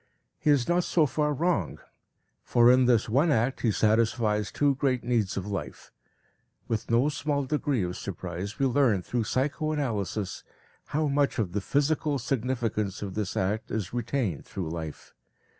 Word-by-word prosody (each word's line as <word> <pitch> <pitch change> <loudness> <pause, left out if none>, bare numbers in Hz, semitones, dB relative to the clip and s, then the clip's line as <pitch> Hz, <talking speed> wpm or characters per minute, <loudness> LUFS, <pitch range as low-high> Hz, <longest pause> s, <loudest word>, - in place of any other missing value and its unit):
He - - 0
is 140 -4 +3
not 175 +1 +2
so 165 -2 +3
far 150 +1 0
wrong, 170 +5 0 0.7
for 120 0 +5
in 130 0 +5
this 120 -3 +3
one 135 +9 +3
act 125 +1 +1
he 115 - +2
satisfies 110 -1 +1
two 145 -1 +2
great 130 -2 0
needs 115 -6 0
of 95 - -3
life. 100 -1 -6 0.8
With 110 -2 -2
no 120 +4 +3
small 145 -1 -1
degree 140 -5 0
of 90 0 -3
surprise 95 +1 -5
we 135 - +1
learn 125 -7 +2
through 120 +2 -1
psychoanalysis 130 - -2 0.4
how 155 +1 0
much 140 0 +1
of 100 -6 -1
the 105 +2 -2
physical 145 +4 +1
significance 115 -6 -2
of 95 -2 -5
this 105 -2 -3
act 100 +4 -1
is 105 -1 -3
retained 120 - -2
through 90 -5 -5
life. 80 -3 -7
120 Hz, 160 wpm, -27 LUFS, 105-140 Hz, 0.8 s, for